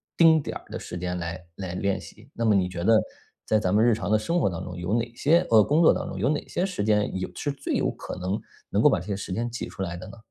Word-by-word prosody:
丁 160 -2 +6
点 - - -5
儿 - - -20
的 - - -5
时 - - -7
间 90 0 -3
来 85 +1 -5
来 95 -2 -5
练 95 0 0
习， 105 +9 -14
那 115 - -1
么 110 - +5
你 95 -2 +2
觉 85 -1 -5
得 110 +1 +5 0.4
在 110 - +3
咱 95 -1 0
们 110 +2 +4
日 120 -1 +5
常 105 -1 -3
的 110 - +4
生 170 +11 0
活 - - +2
当 85 - -5
中， 90 0 -7
有 90 +4 -2
哪 115 0 0
些 160 +7 +4
呃， 110 -2 +7
工 155 +4 +2
作 160 - +7
当 - - -3
中， 95 - -6
有 125 +8 +2
哪 150 - -1
些 180 - -1
时 185 - -3
间， 105 -2 +1
有 95 - -2
是 145 - -2
最 140 0 -4
有 - - +1
可 - - -7
能， 95 +3 -2 0.3
能 - - 0
够 - - +8
把 - - +2
这 90 - -10
些 100 - -1
时 95 -1 -5
间 120 +3 -1
挤 120 - -5
出 95 - -8
来 85 -2 -3
的 85 - -9
呢？ - - -12
105 Hz, 325 characters per minute, -26 LUFS, 90-120 Hz, 0.4 s, 够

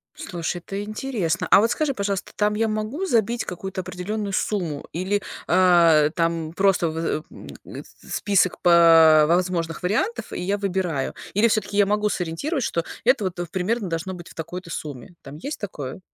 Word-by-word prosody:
Слушай, 175 -2 -4
это 195 +3 -6
интересно. 210 -5 -2
А - - +8
вот 225 +2 +2
скажи, 280 +3 0
пожалуйста, 200 -3 -3
там 210 0 +1
я 225 +1 +1
могу 215 - -2
забить 235 - +1
какую-то 190 +1 -5
определенную 200 +4 -4
сумму 175 -8 -2
или, 190 +4 -1 0.2
а, 170 -5 +5
э, - - 0
там 165 -1 -1
просто 190 -1 +2
вызы 160 -1 -2
м - - -12 0.2
этот - - -9 0.3
список 195 -3 +1
по 165 -3 +7
возможных 170 -2 0
вариантов, 220 - -1
и - - -4
я 195 +3 -1
выбираю. 180 -8 -2 0.2
Или 215 +4 +4
всё-таки 210 -2 -1
я 205 -1 +5
могу 210 +1 +1
сориентировать, 210 - -2
что 170 - -1 0.2
это 245 -2 +3
вот 185 -2 -3
в 175 - -2
примерно 200 +3 -1
должно 165 +3 -3
быть 175 -1 -10
в - - -15
такой-то 170 +2 -7
сумме. 150 0 -7
Там 140 +1 -10
есть 280 - -6
такое? 145 -8 -6
185 Hz, 175 wpm, -23 LUFS, 165-210 Hz, 0.3 s, А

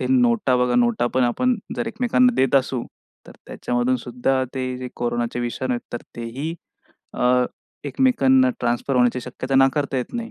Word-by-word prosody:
ते - - -1
नोटा 235 - +3
बघा, 125 0 +1
नोटा 120 0 +2
पण 130 -1 +3
आपण 245 - +1 0.2
जर 240 - -2
एकमेकांना 250 +1 +2
देत 135 0 +2
असू, 130 -2 0 0.4
तर - - -12
त्याच्यामधून 125 +1 -1
सुद्धा 125 +2 -1
ते 130 -1 -3
जे 125 - -5
कोरोनाचे 120 0 -2
विषाणू 125 +2 -2
आहेत, 120 - -3
तर 120 - -5
तेही 125 +8 -4 0.6
अ, 125 0 +3 0.4
एकमेकांना 260 - +3
ट्रान्सफर 120 +3 -1
होण्याची 125 0 +2
शक्यता 125 +2 -5
नाकारता 135 +1 +2
येत 125 - -5
नाही. 235 -1 -4
130 Hz, 165 wpm, -22 LUFS, -, 0.6 s, नोटा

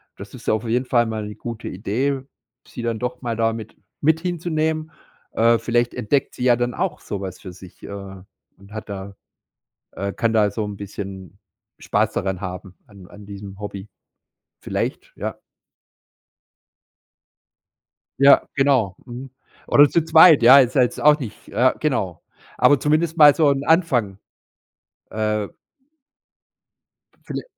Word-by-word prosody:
das - - -11
ist - - -13
ja - - +3
auf 110 0 -1
jeden 125 +3 0
Fall 120 -2 +2
mal 110 -1 -4
'ne 105 0 -8
gute 115 -1 -7
Idee, 125 +8 -2 0.5
sie 120 - -8
dann 115 -2 -2
doch 125 +1 -4
mal 120 -2 -3
da 115 0 +1
mit 110 -1 -9 0.3
mit 160 +2 +3
hinzunehmen. 160 -2 -2 0.4
Äh, 115 +1 +3
vielleicht 120 +1 0
entdeckt 135 +6 -1
sie - - -5
ja 125 -1 +5
dann 120 0 -2
auch 175 -3 -2
so 100 - -6
was 95 -2 -7
für 95 -3 -10
sich, 90 0 -15
äh, - - -8 0.7
und 100 +2 -18
hat 110 -1 -8
da 100 0 -7 0.8
äh, 100 0 -4
kann 115 +2 -1
da 105 -2 +3
so 105 +2 -3
'n 105 -1 -6
bisschen 95 -1 -8 0.4
Spaß - - 0
daran 95 -1 -3
haben 90 0 -7
an 100 -3 -15
an 105 0 -14
diesem 100 -1 -10
Hobby. 100 -1 -7 0.7
Vielleicht, - - -4
ja. - - -5 2.8
Ja, 140 +1 +7
genau, 130 -9 +2
mhm. 125 +2 -9 0.4
Oder 145 0 +6
zu 165 +1 +1
zweit, 160 -2 +7
ja, 130 +4 +9
ist 130 0 +2
halt 130 - +6
jetzt - - -9
auch 150 0 +5
nicht 120 -8 -9
äh, 130 +2 +2
genau. 100 - -2 0.4
Aber 145 - +5
zumindest 155 +4 0
mal 150 -3 +8
so 155 -3 +3
'n 140 0 -1
Anfang. 130 - +1 0.9
Äh 105 -1 -2 1.7
Viele - - -6
115 Hz, 150 wpm, -21 LUFS, 100-140 Hz, 2.8 s, ja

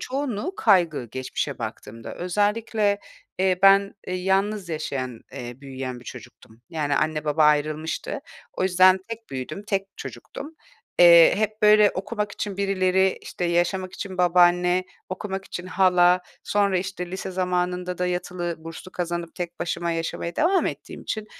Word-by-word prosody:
çoğunluğu 275 - -3
kaygı, 175 - +3
geçmişe 130 +4 -4
baktığımda. 115 0 -7
Özellikle, 205 +2 0 0.4
eee, 185 -1 +2
ben, 195 0 +6
eee, 185 - -3
yalnız 195 +1 0
yaşayan, 135 -6 -4
eee, 120 +2 -8
büyüyen 130 -2 -6
bir 125 - -16
çocuktum. 115 -1 -12
Yani, 145 -3 -1
anne 155 0 0
baba 150 +1 +3
ayrılmıştı. 150 +1 0 0.3
O - - -3
yüzden 185 0 +5
tek 230 0 -7
büyüdüm, 135 +9 -5
tek 195 -2 0
çocuktum. 310 +3 -8 0.4
Eee, 170 -1 +8
hep 215 0 -2
böyle 210 -1 +7
okumak 210 +1 -3
için 200 -2 -4
birileri 190 -1 +2
işte, 180 - -5
yaşamak 175 +2 0
için 190 -2 -7
babaanne, 180 +1 +4 0.2
okumak 190 +1 -5
için 180 -1 -7
hala, 180 -1 +4 0.2
sonra 200 -2 +1
işte, 180 -1 -5
lise 190 0 -5
zamanında 180 0 -1
da 180 - 0
yatılı 180 -1 -3
burslu 165 +3 -10
kazanıp 170 -1 -4
tek 175 -1 -6
başıma 170 0 -2
yaşamaya 165 +1 -3
devam 370 +4 +3
ettiğim - - -6
için 215 -1 -4
180 Hz, 145 wpm, -24 LUFS, 165-195 Hz, 0.4 s, Eee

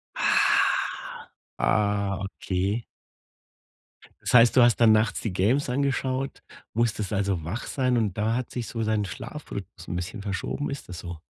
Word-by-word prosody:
Ah, - - +2 0.4
ah, 100 -2 +1
okay. 100 +3 -2 1.4
Das - - -2
heißt, 115 -1 +7
du 125 - +8
hast 120 -1 +5
dann 115 -2 +6
nachts 110 0 +2
die 110 - -2
Games 120 +9 +1
angeschaut, 135 0 -1 0.3
musstest 110 -3 0
also 100 -3 0
wach 100 +9 -4
sein 130 -2 +1
und 110 -4 0
da 110 +2 +1
hat 125 - -3
sich 120 -2 -4
so 115 - -3
dein 110 -2 0
Schlafrythmus 100 - -8
'n 85 - -3
bisschen 90 +3 -5
verschoben. 100 +8 -3
Ist 140 -8 -6
das 90 - -6
so? 85 -2 -7
110 Hz, 155 wpm, -26 LUFS, 100-120 Hz, 1.4 s, du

